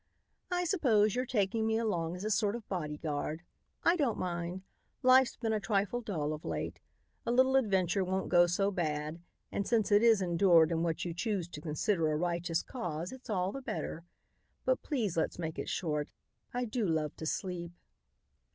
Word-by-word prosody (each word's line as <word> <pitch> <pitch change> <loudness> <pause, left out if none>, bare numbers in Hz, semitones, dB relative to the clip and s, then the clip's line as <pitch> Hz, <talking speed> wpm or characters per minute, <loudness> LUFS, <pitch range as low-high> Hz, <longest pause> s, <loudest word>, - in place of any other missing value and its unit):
"I 360 -1 0
suppose 240 - +3
you're 250 +1 -1
taking 220 -1 +1
me 220 0 +2
along 175 -7 -1
as 180 - -7
a 215 - 0
sort 205 +1 +2
of 235 -3 -8
bodyguard. 155 -2 -3 0.4
I 340 - +5
don't 280 -10 +1
mind. 175 +1 -3 0.4
Life's 255 -1 +6
been 225 -2 -1
a 215 - +1
trifle 205 +3 0
dull 160 -10 -2
of 155 - -7
late. - - -4 0.4
A - - -1
little 260 +2 +4
adventure 195 -6 +2
won't 190 +1 -1
go 175 -1 +5
so 195 +3 +1
bad 155 -2 -2 0.3
and 200 - -2
since 225 -3 +2
it 205 +1 +6
is 230 -3 +6
endured 170 -2 +4
in 165 -1 +1
what 165 0 -1
you 170 - -3
choose 185 -1 -1
to 150 - -8
consider 160 +1 0
a - - +1
righteous 170 0 -1
cause, 175 -8 -4
it's 260 -2 -11
all 185 -2 0
the 275 - -6
better. 165 -9 -4 0.6
But - - +2
please 230 - -1
let's 160 - 0
make 160 -2 -4
it - - -3
short. 150 -5 -1 0.4
I 245 0 -1
do 235 +1 -2
love 155 -3 0
to 160 - -4
sleep." 175 -1 -3
190 Hz, 185 wpm, -32 LUFS, 165-225 Hz, 0.6 s, Life's